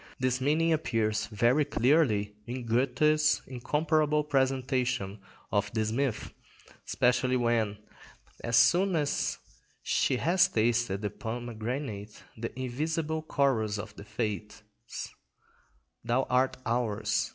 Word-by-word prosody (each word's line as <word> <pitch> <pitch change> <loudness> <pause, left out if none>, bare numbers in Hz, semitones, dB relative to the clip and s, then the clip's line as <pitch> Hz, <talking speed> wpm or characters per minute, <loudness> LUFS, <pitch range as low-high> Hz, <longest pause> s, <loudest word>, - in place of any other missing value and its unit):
This 130 0 0
meaning 160 +4 +2
appears 110 -8 0
very 120 +8 +2
clearly 125 -7 +2
in 125 0 -5
Goethe's 150 +6 +2
incomparable 150 +4 +1
presentation 130 -6 0 0.3
of 105 0 0
this 110 -1 0
myth, 130 0 -2 0.5
especially 125 +1 +2
when, 115 -4 +1 0.7
as 115 0 0
soon 180 +10 +4
as 150 -3 0 0.5
she 130 - +1
has 175 +7 +4
tasted 115 -3 0
the 105 - -1
pomegranate, 115 -1 -5
the 115 +1 -5
invisible 155 +5 -2
chorus 130 -9 +1
of 105 - -7
the - - -10
Fates— 105 -1 -4 1.4
"Thou 120 +3 +1
art 130 +1 +2
ours! 110 -3 0
125 Hz, 105 wpm, -29 LUFS, 110-140 Hz, 1.4 s, soon